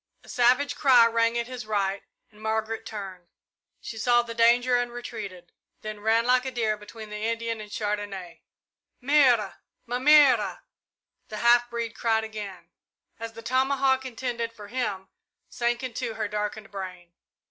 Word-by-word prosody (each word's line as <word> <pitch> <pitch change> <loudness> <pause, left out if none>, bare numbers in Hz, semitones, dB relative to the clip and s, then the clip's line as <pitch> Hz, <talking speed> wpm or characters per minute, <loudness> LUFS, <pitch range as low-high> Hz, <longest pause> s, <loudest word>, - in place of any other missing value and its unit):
A - - -17
savage 250 +4 +3
cry 255 -5 +6
rang 230 0 +2
at 235 - -1
his 245 -3 -8
right, 200 -2 0 0.3
and 210 0 -18
Margaret 220 0 -2
turned. 190 -4 -8 0.5
She 225 - -8
saw 240 +1 +3
the 230 -1 -7
danger 240 +2 +4
and 245 0 0
retreated, 205 -7 -8 0.3
then 215 -1 -6
ran 225 +2 +2
like 250 0 +3
a 260 - -3
deer 225 -4 0
between 210 +1 -11
the 210 0 -5
Indian 230 -1 -2
and 210 - -10
Chandonnais. 205 -4 -4 0.6
"Mère! 260 -5 +4 0.3
Ma 245 +1 -2
mère!" 275 -5 +5 0.7
the 215 - -7
half 240 +1 +4
breed 235 -1 -3
cried 220 -1 +1
again, 210 -4 -8 0.5
as 230 0 -6
the 230 - -11
tomahawk 265 +2 +2
intended 235 -2 -4
for 210 -3 -12
him 210 -6 -3 0.4
sank 240 +1 -1
into 235 -2 -4
her 220 -1 -2
darkened 210 +1 -4
brain. 180 -3 -8
230 Hz, 155 wpm, -26 LUFS, 210-245 Hz, 0.7 s, cry